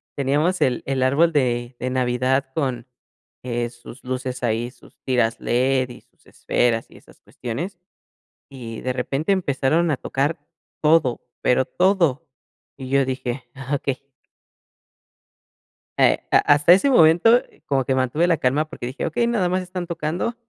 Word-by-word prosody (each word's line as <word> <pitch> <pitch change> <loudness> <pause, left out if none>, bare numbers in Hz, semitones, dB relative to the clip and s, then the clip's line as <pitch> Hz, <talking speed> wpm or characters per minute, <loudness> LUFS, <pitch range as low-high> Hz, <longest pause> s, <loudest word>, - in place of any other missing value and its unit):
teníamos 150 +7 0
el 125 -2 +1
el 135 -1 0
árbol 145 +6 +3
de 120 -3 0
de 130 - -2
Navidad 130 +1 0
con, 130 -5 -2 0.6
eh, 120 -1 -2
sus 120 +1 -13
luces 130 0 -4
ahí, 120 +1 -1
sus - - -21
tiras 120 -3 +1
LED, 130 +1 +1
y 120 - -11
sus - - -35
esferas 115 -2 0
y - - -15
esas - - -20
cuestiones, 160 - -6 0.7
y 115 -5 -8
de 130 - -2
repente 135 +7 -1
empezaron 165 -1 +1
a 145 - +1
tocar 140 +5 -2 0.4
todo, 150 -5 +3 0.2
pero 125 +1 +3
todo, 170 -6 +1 0.5
y 130 -2 -8
yo 140 +1 +3
dije: 130 0 -4
"Ah 135 +1 -4
okey". 135 -1 -4 1.9
Eh, - - +4
ha - - +6
hasta 145 +3 +5
ese 195 +10 +4
momento, 225 +4 +5 0.2
como 135 -2 +1
que 130 - 0
mantuve 130 +6 +1
la 170 -3 +2
calma, 140 +5 +1
porque 120 - -7
dije: 130 +3 -5
"Okey, 240 -1 0
nada 220 -6 +1
más 185 +1 0
están 180 -1 -6
tocando, 170 +6 -3
135 Hz, 150 wpm, -22 LUFS, 125-165 Hz, 1.9 s, ha